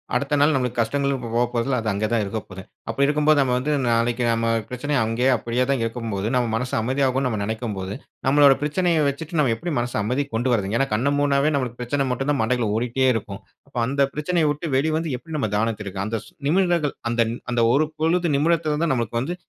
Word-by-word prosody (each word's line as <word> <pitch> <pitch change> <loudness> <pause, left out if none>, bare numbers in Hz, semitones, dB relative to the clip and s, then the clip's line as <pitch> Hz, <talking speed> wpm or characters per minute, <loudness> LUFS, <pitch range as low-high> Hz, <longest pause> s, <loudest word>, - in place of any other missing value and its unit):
அடுத்த 140 +1 0
நாள் 145 +2 +4
நம்மளுக்கு 125 -2 -1
கஷ்டங்களும் 140 +3 -1
போ 115 - -5
போப்போறதில்ல. 120 +2 0
அது 110 - -5
அங்க 100 +2 -1
தான் 115 -2 +2
இருக்கப்போது. 100 -2 -6 0.3
அப்படி 135 +5 +2
இருக்கும்போது, 150 0 +3
நம்ம 130 -2 +1
வந்து 135 +4 -1 0.2
நாளைக்கு 120 +1 +1
நம்ம 115 0 +1 0.2
பிரச்சனை 135 +4 -3
அங்கயே 115 +4 +1
அப்படியே 120 +3 -1
தான் 135 -3 0
இருக்கும்போது, 115 -3 -3
நம்ம 125 -1 +2
மனசு 125 +2 -3
அமைதியாகும்னு 130 +2 +1
நம்ம 110 -4 -2
நெனைக்கும்போது, 105 -3 -4 0.3
நம்மளோட 140 0 +6
பிரச்சனைய 165 +3 +1
வச்சுட்டு, 160 +4 -5
நம்ம 130 -6 +2
எப்படி 170 +8 -4
மனச 120 0 -3
அமைதிக்கு 130 +4 -2
கொண்டு 120 +3 0
வர்றதுங்க? 105 0 0
ஏன்னா 135 - +2
கண்ண 125 +7 +1
மூடுனாவே 145 +1 +2
நம்மளுக்கு 125 -3 -3
பிரச்சன 135 +3 -1
மட்டும் 135 +3 -2
தான் 145 - 0
மண்டைக்குள்ள 115 -1 0
ஓடிட்டே 125 +3 +1
இருக்கும். 100 -3 -5 0.3
அப்போ 135 - -10
அந்த 140 +1 +2
பிரச்சனய 160 +2 +1
விட்டு 150 +3 -4
வெளி 155 +4 +1
வந்து, 160 -1 -2
எப்படி 160 +3 -8
நம்ம 135 -7 -1
தியானத்திருக்கு 105 -3 -2
அந்த 110 +1 -2
ஸ் - - -16 0.2
நிமிடங்கள் 175 -3 +1
அந்த 120 0 +1 0.3
அந்த 120 -1 +2
ஒரு 150 +3 +3
பொழுது, 170 +2 +1
நிமிடத்துல 155 0 +1
தான் 160 - +1
நம்மளுக்கு 115 -1 -1
வந்து 170 +8 -3
125 Hz, 200 wpm, -23 LUFS, 115-145 Hz, 0.3 s, நம்மளோட